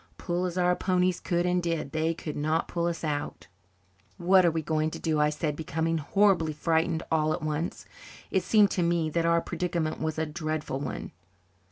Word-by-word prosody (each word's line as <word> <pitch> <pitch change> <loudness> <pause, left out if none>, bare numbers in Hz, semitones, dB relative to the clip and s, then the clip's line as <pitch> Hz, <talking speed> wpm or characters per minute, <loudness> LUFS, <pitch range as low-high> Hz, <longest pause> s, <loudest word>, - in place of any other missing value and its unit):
Pull 175 +1 -2
as 180 0 -3
our 180 0 +3
ponies 180 -1 +1
could 175 0 0
and 180 0 +2
did, 165 -5 -2
they 160 +2 0
could 150 -2 -6
not 155 +2 0
pull 170 -1 -1
us 170 -1 -3
out. 145 -2 -3 0.7
"What 185 +2 +5
are 175 - +5
we 160 -1 -2
to 155 0 0
do?" 155 -2 0
I 150 0 +4
said, 150 0 -2
becoming 160 +1 -1
horribly 175 0 +2
frightened 160 +1 0
all 155 -1 +2
at - - -4
once. 155 +2 -3 0.5
It 190 - +2
seemed 210 0 +4
to 180 - 0
me 170 -2 +1
that 165 +1 +1
our 170 0 +3
predicament 170 -2 -2
was 160 0 -2
a 160 - 0
dreadful 155 -3 -3
one. 140 -2 -5
165 Hz, 190 wpm, -28 LUFS, 155-175 Hz, 0.7 s, What